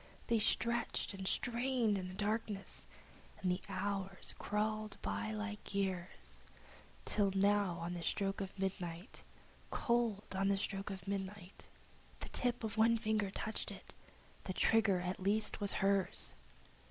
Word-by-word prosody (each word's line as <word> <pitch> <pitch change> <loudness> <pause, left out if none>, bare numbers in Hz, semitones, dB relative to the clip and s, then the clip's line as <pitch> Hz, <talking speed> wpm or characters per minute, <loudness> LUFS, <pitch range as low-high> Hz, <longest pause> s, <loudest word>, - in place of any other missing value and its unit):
They 230 -1 +3
stretched 235 0 +2
and 190 -1 -4
strained 240 -2 +2
in 185 -2 -2
the 185 - -7
darkness, 210 -1 -1 0.5
and 185 - +1
the 180 - 0
hours 195 0 -2
crawled 215 +1 -1
by 220 - -1
like 210 -1 -4
years, 190 -2 -2 0.6
Till, 205 -2 +3 0.2
on 180 -4 +2
the 175 - -4
stroke 195 +4 0
of 195 0 -5
midnight, 190 +1 -3 0.5
Cold 235 -6 +1
on 195 +1 +2
the 200 0 +3
stroke 195 +1 -2
of 190 -3 -6
midnight, 195 -1 -4 0.5
The - - -5
tip 245 -1 0
of 220 0 -3
one 230 +1 +6
finger 215 -2 +1
touched 215 +3 -3
it! - - -9 0.5
The 185 - -2
trigger 210 -3 +4
at 180 +1 -2
least 210 +3 +1
was 200 - 0
hers! 195 -1 +2
200 Hz, 140 wpm, -37 LUFS, 190-215 Hz, 0.6 s, one